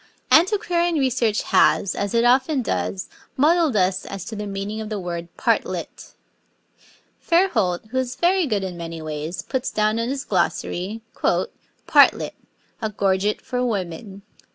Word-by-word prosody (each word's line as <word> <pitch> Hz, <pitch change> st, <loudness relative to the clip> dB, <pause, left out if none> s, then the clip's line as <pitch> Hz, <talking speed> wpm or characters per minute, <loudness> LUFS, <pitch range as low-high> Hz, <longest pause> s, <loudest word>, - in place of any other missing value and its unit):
Antiquarian 345 Hz, -1 st, +3 dB
research 255 Hz, -6 st, +1 dB
has, 195 Hz, -, +3 dB
as 200 Hz, +2 st, -2 dB
it 235 Hz, +1 st, +3 dB
often 260 Hz, +2 st, +3 dB
does, 90 Hz, -, -2 dB, 0.3 s
muddled 315 Hz, -1 st, +3 dB
us 185 Hz, -1 st, +1 dB
as 195 Hz, -2 st, -6 dB
to 220 Hz, -, -6 dB
the 210 Hz, 0 st, -5 dB
meaning 200 Hz, +2 st, -4 dB
of 215 Hz, -, -6 dB
the 210 Hz, -2 st, -3 dB
word 170 Hz, -2 st, -5 dB
'partlet.' -, -, -2 dB, 1.1 s
Fairholt, 230 Hz, -, +1 dB
who 260 Hz, -, 0 dB
is 255 Hz, -1 st, -3 dB
very 355 Hz, -1 st, +2 dB
good 210 Hz, -5 st, 0 dB
in 185 Hz, -2 st, -4 dB
many 165 Hz, -1 st, -6 dB
ways, 155 Hz, +2 st, -5 dB
puts 260 Hz, 0 st, -2 dB
down 215 Hz, +1 st, +1 dB
in 230 Hz, +1 st, -1 dB
his 275 Hz, +1 st, -3 dB
glossary, 190 Hz, +3 st, -1 dB
'Partlet: -, -, +2 dB, 0.5 s
A 220 Hz, -, -1 dB
gorget 200 Hz, 0 st, 0 dB
for 250 Hz, -1 st, -2 dB
women.' 195 Hz, -2 st, -4 dB
215 Hz, 145 wpm, -22 LUFS, 185-260 Hz, 1.1 s, Antiquarian